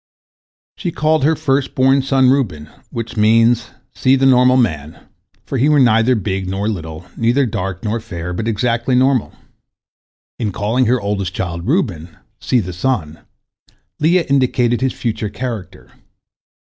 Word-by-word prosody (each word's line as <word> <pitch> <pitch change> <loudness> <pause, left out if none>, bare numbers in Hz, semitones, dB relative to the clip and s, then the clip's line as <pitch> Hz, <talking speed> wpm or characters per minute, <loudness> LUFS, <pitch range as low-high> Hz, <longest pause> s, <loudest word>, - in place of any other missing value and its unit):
She 175 - -3
called 155 -2 +1
her 160 +3 +3
first 135 -2 -1
born 135 +1 +3
son 130 -1 +3
Reuben, 90 - -1 0.2
which 115 -1 -6
means 115 +2 +3 0.2
"See 130 0 +2
the 135 0 +1
normal 125 -1 +5
man," 80 - -1 0.5
for 135 - -3
he 140 +5 +3
was 145 -3 +5
neither 115 +1 +3
big 95 -3 -3
nor 100 +2 -2
little, 80 -5 -5
neither 120 +4 +2
dark 95 -4 -4
nor 110 +1 -1
fair, 90 -6 -6
but 110 +5 -3
exactly 120 +3 0
normal. 130 -1 +2 1.1
In 110 -4 -1
calling 110 +7 0
her 125 +2 +2
oldest 100 -3 -3
child 85 -1 -4
Reuben, 90 - -1 0.2
"See 125 - +1
the 90 -2 -6
son," 85 -6 -2 0.8
Leah 170 +3 +2
indicated 125 -3 +1
his 130 -1 0
future 110 -3 -3
character. 115 -4 -7
115 Hz, 145 wpm, -17 LUFS, 95-130 Hz, 1.1 s, normal